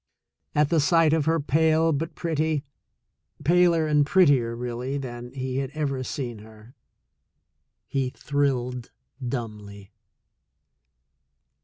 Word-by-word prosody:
At 150 -1 +3
the 165 - +3
sight 160 +1 +4
of 160 -3 +1
her, 165 +1 +2
pale, 160 +2 +2
but 160 +3 -3
pretty 160 -3 -1 0.4
— - - -24
paler 170 0 +4
and 150 -1 +3
prettier, 145 -8 +3
really, 125 +3 -4
than 120 -2 -7
he 130 -1 -4
had 135 -1 -2
ever 140 -4 -2
seen 120 -4 -5
her 110 +2 -15 0.6
— - - -52
he 135 -2 -1
thrilled 125 -4 -2 0.3
dumbly. 105 -5 -6
140 Hz, 120 wpm, -25 LUFS, 120-155 Hz, 0.6 s, sight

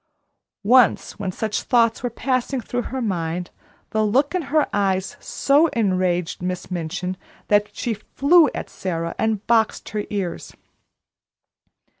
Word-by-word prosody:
Once 245 +4 +3
when 190 -2 -2
such 215 +2 -2
thoughts 230 -2 +2
were 245 - -1
passing 255 +2 -1
through 245 +1 -3
her 260 0 -4
mind 175 -3 -2 0.4
the 220 0 +1
look 265 - +2
in 365 - 0
her 305 +1 +3
eyes 195 +4 0
so 290 +4 +3
enraged 185 -6 0
Miss 180 0 -4
Minchin 180 +2 -3 0.3
that 205 0 +3
she 240 - -2
flew 285 - +3
at - - -4
Sara 170 -2 -4
and 220 -2 0
boxed 225 -2 +1
her 210 0 -3
ears. 195 -4 -4
215 Hz, 135 wpm, -22 LUFS, 185-245 Hz, 0.4 s, Once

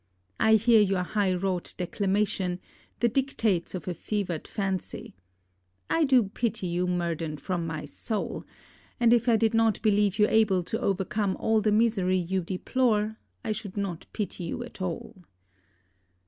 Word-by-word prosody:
I 220 0 +5
hear 225 +1 +5
your 195 -3 +2
high 200 0 0
wrought 180 -1 -2
declamation, 190 0 0 0.4
the 240 - +5
dictates 225 -8 0
of 175 -5 -6
a 180 - -1
fevered 180 -2 -3
fancy. 190 -3 -4 0.8
I 330 - +3
do 260 -4 +5
pity 215 0 -2
you, 175 +1 0
Murden, 170 -3 -2
from 170 +3 -3
my 160 -1 -4
soul; 215 -3 -4 0.6
and 235 -1 +5
if 240 +1 +3
I 230 - +5
did 225 0 +2
not 225 -2 +3
believe 205 -2 +3
you 210 - +5
able 210 -5 +3
to 220 +6 -3
overcome 195 +1 0
all 220 -1 +2
the 215 0 +2
misery 210 -4 +2
you 185 +1 -1
deplore 215 +4 0 0.3
I 220 - -1
should 205 -2 -5
not 190 -4 -3
pity 200 -4 -4
you 205 +8 -4
at 240 - -11
all. 180 +1 -4
200 Hz, 155 wpm, -27 LUFS, 180-220 Hz, 0.8 s, I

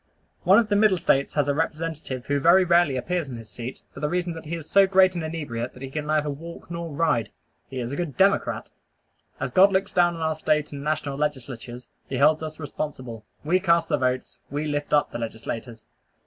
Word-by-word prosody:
One 190 +3 +7
of 230 -2 +4
the 205 - +2
Middle 205 -2 +4
States 140 -4 +1
has 145 -2 +2
a 145 - +2
representative 155 -4 -3
who 145 0 0
very 170 +6 +6
rarely 170 -6 +3
appears 170 +4 -2
in 125 - -6
his 115 -2 -11
seat, 120 +2 -7
for - - -9
the 150 +1 -1
reason 175 0 -1
that 160 0 -9
he 170 - -3
is 160 -2 -8
so 195 -1 +5
great 190 -1 +5
an 175 - -3
inebriate 145 -7 -4
that 125 - -10
he 135 - -6
can 150 +1 -4
neither 155 -1 +1
walk 165 +4 -9
nor 170 0 -4
ride. 145 -7 +1 0.4
He 130 - -5
is 120 0 -3
a - - -3
good 165 -4 -4
Democrat. 195 +1 +2 0.7
As - - -3
God 195 +1 +6
looks 190 +1 0
down 175 -1 +3
on 165 - -7
our 160 0 +1
State 150 -1 0
and 140 -1 -6
national 145 -2 -2
legislatures, 125 -4 -4 0.2
he 130 - -2
holds 150 +4 +4
us 155 0 -6
responsible. 130 -6 -6 0.2
We 175 +5 +2
cast 170 -2 +2
the 150 - +2
votes. 130 0 -1
We 145 +3 -2
lift 145 -1 -2
up 145 -1 +3
the - - -5
legislators. 115 0 -6
150 Hz, 220 wpm, -25 LUFS, 135-170 Hz, 0.7 s, One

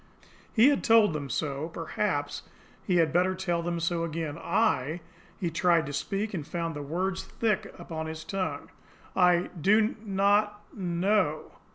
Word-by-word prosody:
He 235 +4 +6
had 285 - +1
told 225 -6 +5
them 145 -2 -4
so 145 +4 -2
perhaps 165 -3 -2 0.4
he 180 - 0
had 165 -2 +3
better 185 +2 +2
tell 175 -2 -1
them 170 0 -2
so 170 0 0
again. 160 -2 -3
"I 165 - 0 0.2
" - - -27
He 170 -3 -1
tried 170 -1 +3
to 145 - -6
speak, 205 +8 -2
and 175 - -2
found 165 +1 -3
the 145 - -4
words 185 +6 -2
thick 215 -4 -1
upon 160 -1 -5
his 160 0 -6
tongue. 190 +2 -4 0.4
"I 180 -1 +3
do 215 +5 +4
not 205 +1 +2
know." 180 -3 0
175 Hz, 160 wpm, -28 LUFS, 160-200 Hz, 0.4 s, He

